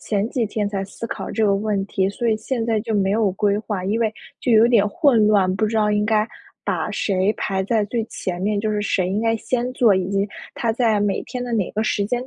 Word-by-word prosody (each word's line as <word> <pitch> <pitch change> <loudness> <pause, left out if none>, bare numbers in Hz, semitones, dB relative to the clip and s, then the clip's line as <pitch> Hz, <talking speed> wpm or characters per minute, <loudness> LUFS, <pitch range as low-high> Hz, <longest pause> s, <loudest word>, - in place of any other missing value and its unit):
前 205 0 -1
几 240 -5 0
天 210 0 -2
才 195 -1 -3
思 200 +4 -7
考 - - -5
这 220 - 0
个 200 -1 +3
问 205 -1 -1
题， 190 -1 0
所 230 +4 -2
以 220 - +2
现 230 +2 -3
在 225 -2 +1
就 225 0 -3
没 195 -2 +2
有 210 -1 +2
规 200 +1 +1
划， 210 -4 -4
因 205 +4 0
为 220 -2 +1 0.3
就 245 - +1
有 220 +1 +7
点 220 -4 +4
混 230 -1 +3
乱， 195 -3 +3
不 220 - +1
知 225 +1 -2
道 210 -1 +2
应 210 0 +1
该 215 0 +2 0.4
把 - - -1
谁 195 0 +1
排 190 -1 -1
在 215 +1 +1
最 225 +1 -2
前 180 -5 -5
面， 205 +1 0
就 215 0 -1
是 210 -1 -1
谁 185 -3 0
应 195 +3 -1
该 225 0 +2
先 245 +2 -2
做， 235 -5 +4
以 185 -1 0
及 200 +1 0 0.3
它 230 -2 0
在 225 -3 +2
每 205 -1 0
天 250 -1 -5
的 245 -1 -5
哪 210 -5 0
个 215 - 0
时 205 -2 0
间 245 +4 -2
210 Hz, 275 characters per minute, -21 LUFS, 200-225 Hz, 0.4 s, 有